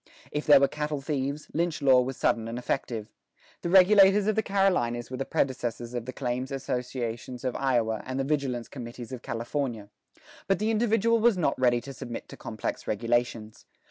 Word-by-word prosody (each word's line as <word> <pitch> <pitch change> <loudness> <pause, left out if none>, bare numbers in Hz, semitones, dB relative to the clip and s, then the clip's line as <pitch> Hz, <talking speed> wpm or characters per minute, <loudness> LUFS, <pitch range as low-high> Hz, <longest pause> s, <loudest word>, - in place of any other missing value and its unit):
If 150 - -3
there 145 -2 +9
were 140 - +4
cattle 150 0 -3
thieves, 140 +1 -3
lynch 170 0 0
law 135 -3 +5
was 130 +1 -4
sudden 115 -1 +1
and 115 +1 -5
effective: 115 -3 -3 0.5
the 170 - -2
regulators 195 +2 +6
of 215 0 +1
the 220 - +2
Carolinas 180 - +1
were 130 - -4
the 135 - -2
predecessors 120 -2 -2
of 120 -2 -3
the - - -3
claims 130 0 -3
associations 125 -2 -4
of 130 -2 -2
Iowa 120 -5 +1
and 130 +1 -4
the - - +1
vigilance 135 -4 -1
committees 120 -1 -8
of 130 -2 -6
California. 115 -2 -3 0.6
But 195 -1 +3
the 215 +3 0
individual 225 0 +2
was 225 -3 +4
not 150 -5 +2
ready 120 -2 +3
to 140 - -8
submit 120 -2 -7
to - - -9
complex - - -5
regulations. 115 0 -1
130 Hz, 180 wpm, -27 LUFS, 120-155 Hz, 0.6 s, there